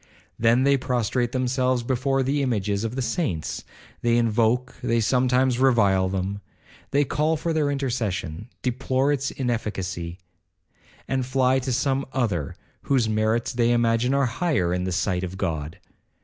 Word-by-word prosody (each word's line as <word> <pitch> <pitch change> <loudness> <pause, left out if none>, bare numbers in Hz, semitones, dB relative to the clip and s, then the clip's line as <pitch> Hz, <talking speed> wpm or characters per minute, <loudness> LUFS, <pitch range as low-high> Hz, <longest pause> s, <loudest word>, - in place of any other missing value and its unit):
Then 115 +3 +4
they 140 0 +4
prostrate 125 -1 -1
themselves 130 -1 0
before 135 +2 0
the 140 +2 0
images 105 -5 0
of 115 +2 -3
the 130 - -1
saints,—they 120 - -2
invoke, 120 +2 +1
they 115 0 +1
sometimes 125 +2 +2
revile 100 -8 +3
them. 95 +2 -3 0.5
They 145 +1 +2
call 155 +4 +1
for 165 +2 -2
their 150 -2 +1
intercession, 120 - -2
deplore 130 +2 +1
its 135 -1 -1
inefficacy, 95 -8 -3 0.9
and 135 -1 0
fly 130 0 +2
to 130 0 -3
some 135 +2 0
other, 100 - -1 0.3
whose 130 -5 +1
merits 110 +2 0
they 120 -1 +2
imagine 120 +2 +2
are 140 -1 +3
higher 125 - 0
in 90 0 -1
the 95 - -2
sight 90 0 0
of 95 +1 -5
God. 80 -3 -3
120 Hz, 145 wpm, -24 LUFS, 105-130 Hz, 0.9 s, Then